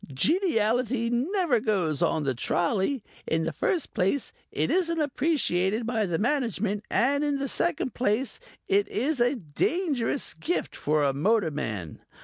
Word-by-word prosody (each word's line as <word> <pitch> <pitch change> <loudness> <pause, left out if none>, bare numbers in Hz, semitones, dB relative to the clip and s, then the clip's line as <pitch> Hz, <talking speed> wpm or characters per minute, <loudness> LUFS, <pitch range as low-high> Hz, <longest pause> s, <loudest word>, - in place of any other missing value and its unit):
Geniality 235 - +1
never 290 - +1
goes 185 - 0
on 160 -2 +1
the 135 -2 0
trolley. 190 - 0 0.2
In 160 0 +1
the 165 - -1
first 320 - -1
place 210 +7 0 0.2
it - - 0
isn't 335 -3 +1
appreciated 245 - +1
by 225 -3 0
the 170 -2 0
Management 225 - 0
and 280 +7 +2
in 290 -1 +1
the 275 0 -2
second 285 -3 -1
place 245 +2 0 0.3
it 200 +1 +3
is 265 +6 -1
a 245 +3 +3
dangerous 255 - -1
gift 350 +3 -2
for 150 0 +1
a 140 -1 +2
motor 190 +4 +2
man. 105 - -4
230 Hz, 145 wpm, -27 LUFS, 175-280 Hz, 0.3 s, it